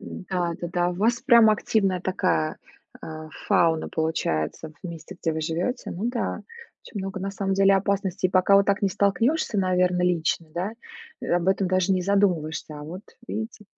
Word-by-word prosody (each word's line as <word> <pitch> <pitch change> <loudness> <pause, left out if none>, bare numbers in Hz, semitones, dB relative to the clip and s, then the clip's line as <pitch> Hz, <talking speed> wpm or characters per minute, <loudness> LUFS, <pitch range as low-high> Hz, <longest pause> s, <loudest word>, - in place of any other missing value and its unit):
Да, 180 -2 -3
да-да, 175 0 0
у - - -5
вас 230 +6 +1
прям 235 -4 +6
активная 195 -3 +1
такая, 80 - 0 0.4
а, 155 0 -8 0.2
фауна 165 -2 +3
получается 160 - -2
в 185 - -5
месте, 170 +2 -9
где 165 - 0
вы 160 - -3
живете. 165 - -2
Ну 195 +6 -3
да, 240 - -3 0.4
очень 210 - -7
много 195 0 -5
на 195 +1 -3
самом 195 0 -1
деле 195 0 +5
опасностей, 195 -1 0
и - - -11
пока 185 +1 +5
вот 200 -1 +4
так 200 0 +1
не 200 - +3
столкнешься, 210 - +1
наверно, 180 -1 +2
лично, 170 -2 +1
да, 185 +5 -2 0.5
э, - - -6
об 175 0 +1
этом 190 -1 +2
даже 185 +1 +2
не 185 -1 +1
задумываешься. 170 -6 0
А - - -8
вот, 175 +6 -8 0.3
видите. 220 -1 -5
185 Hz, 180 wpm, -25 LUFS, 170-200 Hz, 0.5 s, прям